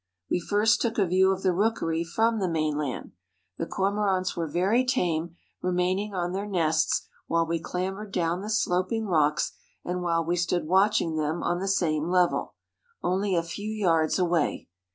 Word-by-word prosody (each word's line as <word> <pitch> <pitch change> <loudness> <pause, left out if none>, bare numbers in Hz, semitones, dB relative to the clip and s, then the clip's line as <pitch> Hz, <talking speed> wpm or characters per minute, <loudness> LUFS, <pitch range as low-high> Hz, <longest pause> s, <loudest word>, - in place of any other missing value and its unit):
We - - +2
first 210 +5 +2
took 230 -2 -1
a 200 - +3
view 185 +2 +3
of 190 0 -3
the 185 -2 +3
rookery 170 -5 0
from 225 +6 +1
the 190 -2 0
mainland. 150 -4 -2 0.5
The 165 - -2
Cormorants 195 -1 0
were 165 -1 -2
very 195 - +2
tame, 170 -10 -1 0.3
remaining 185 +3 0
on 175 -1 -1
their 195 +2 -3
nests 160 -5 +1 0.2
while 165 0 +2
we 165 0 -1
clambered 190 +5 -4
down 175 0 0
the 210 - -6
sloping 220 +1 0
rocks 150 -5 +2 0.3
and 180 +1 -2
while 165 -1 0
we 175 +2 0
stood 175 -1 0
watching 185 -2 +2
them 155 +2 -1
on 175 0 0
the 195 - -3
same 165 -5 +1
level, 180 -1 +1 0.5
only 190 +1 +1
a 170 - +1
few 205 +5 -6
yards 170 -7 +1
away. 175 - 0
180 Hz, 170 wpm, -27 LUFS, 165-195 Hz, 0.5 s, a